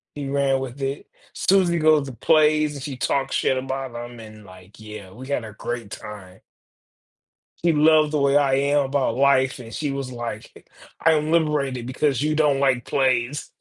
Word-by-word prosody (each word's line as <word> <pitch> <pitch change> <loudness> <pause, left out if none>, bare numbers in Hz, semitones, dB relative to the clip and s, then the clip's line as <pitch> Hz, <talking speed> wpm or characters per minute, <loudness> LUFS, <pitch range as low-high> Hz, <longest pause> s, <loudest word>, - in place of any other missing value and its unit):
He 145 -1 -5
ran 135 -1 +1
with 130 +1 -7
it. 135 +2 -4 0.3
Susie 180 -3 +2
goes 155 -3 +3
to 130 - -7
plays 155 +3 +3
and 140 - -8
she 140 -3 -6
talks 135 +2 -1
shit 130 - +1
about 130 -1 -4
them 120 0 -8
and 110 -1 -12
like, 95 +2 -16
yeah, 105 -3 -10
we 130 +6 -11
had 130 -5 -2
a 105 - -10
great 115 -1 -6
time. 100 -3 -10 1.3
She 170 - +5
loved 155 0 +4
the 150 - 0
way 140 0 +2
I 140 -2 +3
am 140 +1 +2
about 135 -4 0
life 135 -1 +3
and 115 -2 -10
she 150 - -3
was 135 -2 -5
like, 120 -3 -8 0.3
"I'm 155 -1 +2
liberated 140 -7 0
because 135 0 0
you 155 +1 0
don't 145 -3 +2
like 130 -3 +2
plays." 130 +1 0
135 Hz, 180 wpm, -23 LUFS, 120-150 Hz, 1.3 s, She